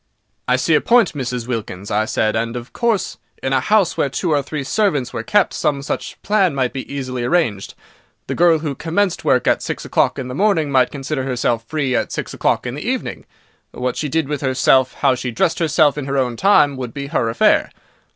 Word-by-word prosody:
"I -, -, +3 dB
see -, -, 0 dB
your -, -, +5 dB
point, 235 Hz, -5 st, +3 dB
Mrs. 125 Hz, -4 st, -4 dB
Wilkins," 105 Hz, -5 st, -5 dB
I 105 Hz, +1 st, +1 dB
said, 110 Hz, -1 st, 0 dB
"and, 115 Hz, +1 st, -2 dB
of 120 Hz, 0 st, -7 dB
course, 230 Hz, -4 st, -1 dB, 0.3 s
in 135 Hz, -, 0 dB
a 130 Hz, -, +3 dB
house 200 Hz, +6 st, +2 dB
where 140 Hz, -, 0 dB
two 165 Hz, +5 st, -2 dB
or 145 Hz, -2 st, +3 dB
three 140 Hz, +1 st, -5 dB
servants 145 Hz, -, 0 dB
were -, -, -3 dB
kept 205 Hz, -2 st, +2 dB
some 145 Hz, -3 st, -1 dB
such -, -, -4 dB
plan 195 Hz, -6 st, +2 dB
might 130 Hz, -1 st, -1 dB
easily 130 Hz, -2 st, -4 dB
be 120 Hz, -, -1 dB
arranged. 125 Hz, -, 0 dB, 0.5 s
The -, -, -3 dB
girl 170 Hz, -1 st, +4 dB
who 150 Hz, -2 st, -3 dB
commenced 170 Hz, +6 st, -1 dB
work -, -, +2 dB
at -, -, +2 dB
six -, -, -5 dB
o'clock -, -, +1 dB
in 130 Hz, -, -4 dB
the 125 Hz, -, -6 dB
morning 165 Hz, -3 st, +1 dB
might 130 Hz, -2 st, +3 dB
consider 140 Hz, 0 st, -4 dB
herself 120 Hz, -3 st, -1 dB
free 140 Hz, -2 st, -1 dB
at -, -, -1 dB
six -, -, -4 dB
o'clock -, -, 0 dB
in -, -, -3 dB
the -, -, -6 dB
evening. -, -, -4 dB, 0.5 s
What 125 Hz, 0 st, -2 dB
she 150 Hz, -, -3 dB
did 160 Hz, 0 st, 0 dB
with 145 Hz, -1 st, -3 dB
herself, 130 Hz, -1 st, +3 dB
how 135 Hz, -2 st, +4 dB
she 125 Hz, 0 st, -4 dB
dressed 160 Hz, +9 st, 0 dB
herself 155 Hz, -3 st, +3 dB
in 140 Hz, -, -5 dB
her 140 Hz, 0 st, -2 dB
own 125 Hz, -3 st, 0 dB
time, 145 Hz, -, +4 dB
would 125 Hz, -3 st, -6 dB
be 140 Hz, -1 st, -4 dB
her 115 Hz, -4 st, -1 dB
affair. 115 Hz, -, +3 dB
140 Hz, 220 wpm, -19 LUFS, 125-160 Hz, 0.5 s, your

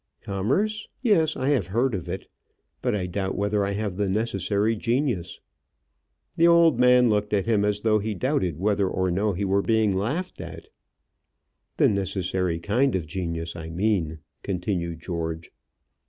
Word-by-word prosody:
"Commerce. 185 Hz, -, -1 dB, 0.2 s
Yes, 165 Hz, -, +3 dB
I 130 Hz, +2 st, 0 dB
have 125 Hz, -12 st, +1 dB
heard 120 Hz, +6 st, +1 dB
of 95 Hz, -4 st, -4 dB
it. -, -, -4 dB, 0.6 s
But -, -, 0 dB
I 95 Hz, -3 st, -1 dB
doubt 95 Hz, +1 st, -3 dB
whether 100 Hz, 0 st, +1 dB
I 100 Hz, 0 st, -1 dB
have 100 Hz, -2 st, -3 dB
the 100 Hz, -1 st, 0 dB
necessary 105 Hz, +1 st, 0 dB
genius." 115 Hz, -, -1 dB, 1.0 s
The 170 Hz, -, +5 dB
old 170 Hz, -6 st, +5 dB
man 125 Hz, 0 st, +6 dB
looked 105 Hz, -1 st, 0 dB
at 100 Hz, -, 0 dB
him 110 Hz, -3 st, +2 dB
as 105 Hz, 0 st, 0 dB
though 110 Hz, -1 st, +3 dB
he 105 Hz, +1 st, -3 dB
doubted 95 Hz, -, 0 dB
whether 100 Hz, +1 st, +1 dB
or 95 Hz, -1 st, 0 dB
no 100 Hz, +3 st, +1 dB
he 100 Hz, +3 st, -2 dB
were 100 Hz, +1 st, +2 dB
being 110 Hz, -2 st, +2 dB
laughed 150 Hz, -, -2 dB
at. -, -, -9 dB, 1.1 s
"The -, -, +5 dB
necessary 95 Hz, -3 st, -1 dB
kind 115 Hz, +9 st, +1 dB
of 90 Hz, -4 st, -1 dB
genius, 85 Hz, 0 st, -4 dB
I 80 Hz, -1 st, -7 dB
mean," 85 Hz, -3 st, 0 dB, 0.2 s
continued 90 Hz, -3 st, -3 dB
George. 80 Hz, -1 st, -4 dB
100 Hz, 160 wpm, -25 LUFS, 90-115 Hz, 1.1 s, man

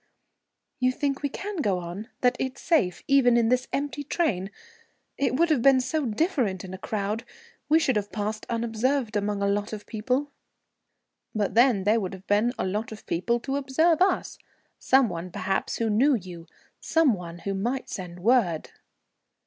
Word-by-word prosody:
"You 255 Hz, 0 st, +3 dB
think 280 Hz, 0 st, -2 dB
we 285 Hz, -, -1 dB
can 400 Hz, +7 st, -6 dB
go 205 Hz, -, +1 dB
on, 180 Hz, +5 st, -6 dB
that 250 Hz, 0 st, +3 dB
it's 260 Hz, 0 st, -3 dB
safe, 185 Hz, -, +1 dB
even 260 Hz, -4 st, +5 dB
in 230 Hz, -1 st, +3 dB
this 250 Hz, +1 st, +1 dB
empty 290 Hz, +1 st, -2 dB
train? 225 Hz, -, -1 dB, 0.7 s
It 275 Hz, -, 0 dB
would 335 Hz, +4 st, +3 dB
have 285 Hz, -6 st, +3 dB
been 270 Hz, +1 st, +6 dB
so 265 Hz, +2 st, -1 dB
different 225 Hz, -, 0 dB
in 185 Hz, -, -8 dB
a 190 Hz, -, -7 dB
crowd. 210 Hz, +2 st, -2 dB, 0.5 s
We 310 Hz, -, +6 dB
should 265 Hz, -7 st, +2 dB
have 205 Hz, -1 st, -3 dB
passed 215 Hz, +1 st, -3 dB
unobserved 235 Hz, +1 st, 0 dB
among 205 Hz, -1 st, -1 dB
a -, -, +2 dB
lot 205 Hz, +2 st, -1 dB
of 210 Hz, -1 st, -6 dB
people." 255 Hz, +6 st, -2 dB, 1.0 s
"But 205 Hz, -3 st, 0 dB
then 235 Hz, -3 st, +4 dB
there 215 Hz, +3 st, +3 dB
would 190 Hz, -2 st, -4 dB
have 190 Hz, 0 st, -11 dB
been 210 Hz, +4 st, +2 dB
a -, -, -1 dB
lot 210 Hz, +5 st, -2 dB
of 220 Hz, -, -10 dB
people 235 Hz, +8 st, 0 dB
to 270 Hz, +2 st, -2 dB
observe 310 Hz, +5 st, +2 dB
us; 375 Hz, -1 st, +1 dB, 0.4 s
some 265 Hz, -1 st, +4 dB
one, 175 Hz, -1 st, -5 dB
perhaps, 190 Hz, +2 st, -2 dB
who 230 Hz, -, 0 dB
knew 255 Hz, +7 st, +4 dB
you, 175 Hz, -5 st, -8 dB, 0.3 s
some 320 Hz, -6 st, +3 dB
one 175 Hz, -3 st, -7 dB
who 195 Hz, +3 st, -4 dB
might 240 Hz, +7 st, -2 dB
send 180 Hz, -2 st, -7 dB
word." 205 Hz, -7 st, +2 dB
230 Hz, 180 wpm, -26 LUFS, 200-270 Hz, 1.0 s, been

